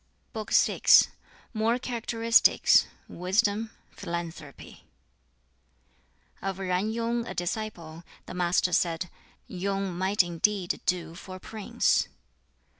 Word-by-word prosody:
] - - -42
BOOK 220 -2 -6
VI - - +3 0.7
More 225 +2 +1
Characteristics 230 -2 +3 0.2
Wisdom 205 +4 0 0.2
Philanthropy 165 -4 -7 1.6
Of 195 0 -3
Yen 185 +2 -1
Yung, 230 +1 -2
a - - -6
disciple, 175 -3 -5 0.2
the - - -8
Master 180 0 +1
said, 170 +1 0 0.3
"Yung 195 0 -3
might 190 +2 +2
indeed 175 +2 -1
do 175 -2 -1
for 185 +2 -10
a - - -9
prince!" 215 +2 0
190 Hz, 105 wpm, -27 LUFS, 175-220 Hz, 1.6 s, VI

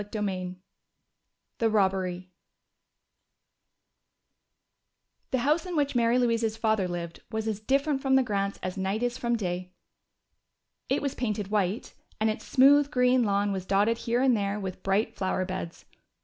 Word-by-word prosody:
CHAPTER 210 0 -3
II 185 -1 -4 1.0
The 225 - +3
Robbery 190 -3 0 3.0
The 260 - +1
house 315 +5 +2
in 355 - -4
which 285 -2 +1
Mary 235 0 +3
Louise's 230 -3 +1
family 220 -4 +1
lived 170 -1 -5
was 220 -1 -3
as 215 -2 -2
different 275 +5 +1
from 265 -1 +2
the 265 - +5
Grants' 200 -3 -1
as 185 +1 -4
day 190 +1 -1
is 245 +2 -2
from 235 0 0
night. 180 -4 -3 1.2
It 270 - +1
was 280 - -1
painted 210 -5 -3
white, 205 0 -1 0.3
and 220 0 +2
its 215 - -7
smooth 280 +2 +5
green 250 -2 +3
lawn 200 0 +1
was 190 -1 -4
dotted 205 +4 +2
here 240 +2 0
and 260 -3 +4
there 200 0 -1
with 190 -2 -6
bright 195 +3 0
flower 185 -1 -1
beds. 185 -3 -6
215 Hz, 150 wpm, -27 LUFS, 190-250 Hz, 3.0 s, the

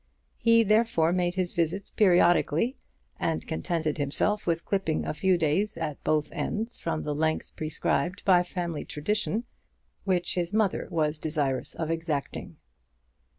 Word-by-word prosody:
He 230 0 +5
therefore 210 -6 +3
made 180 -1 0
his 185 -2 -1
visits 170 +4 -1
periodically, 180 - +3 0.4
and 165 -1 -1
contented 160 -2 -2
himself 190 +9 0
with 170 -1 0
clipping 190 -6 0
a - - -2
few 185 +3 +2
days 170 +6 +1
at 155 -3 -4
both 155 -1 +1
ends 225 +3 -3
from 160 -2 -2
the 150 - -2
length 155 +1 -1
prescribed 160 +3 -1
by 180 -3 +6
family 175 -3 -4
tradition, 210 +8 -1 0.6
which 180 -3 0
his 175 +1 -2
mother 215 -3 +1
was 155 -1 0
desirous 145 -4 -1
of 160 -1 -2
exacting. 165 -4 -3
170 Hz, 140 wpm, -27 LUFS, 155-195 Hz, 0.6 s, by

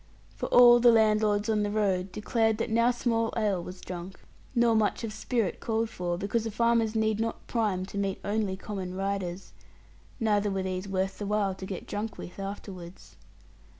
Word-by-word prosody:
For - - -3
all 240 0 +8
the 240 0 +7
landlords 215 -2 +3
on 215 -1 +1
the 205 - 0
road 195 -3 0
declared 220 +2 +1
that 230 0 -2
now 230 +2 +4
small 230 -2 0
ale 205 -5 +1
was 180 +1 -9
drunk, 180 +1 -7 0.4
nor 235 -1 +4
much 220 +1 +1
of 220 -2 -4
spirits 220 -2 -1
called 225 0 -1
for, 175 -3 -2
because 205 +4 -1
the 225 - -3
farmers 230 0 +1
need 220 -1 +1
not 225 0 -3
prime 205 -6 -1
to 200 +1 -5
meet 195 -1 -1
only 205 -2 -1
common 190 -3 -5
riders, 195 -1 -3 0.7
neither 210 -3 +2
were 195 -1 -2
these 185 +1 -3
worth 190 0 -1
the 205 - -3
while 205 -2 +1
to 190 0 -8
get 190 - -6
drunk 210 +2 -4
with 180 - -9
afterwards. 195 -3 -8
210 Hz, 185 wpm, -28 LUFS, 190-225 Hz, 0.7 s, all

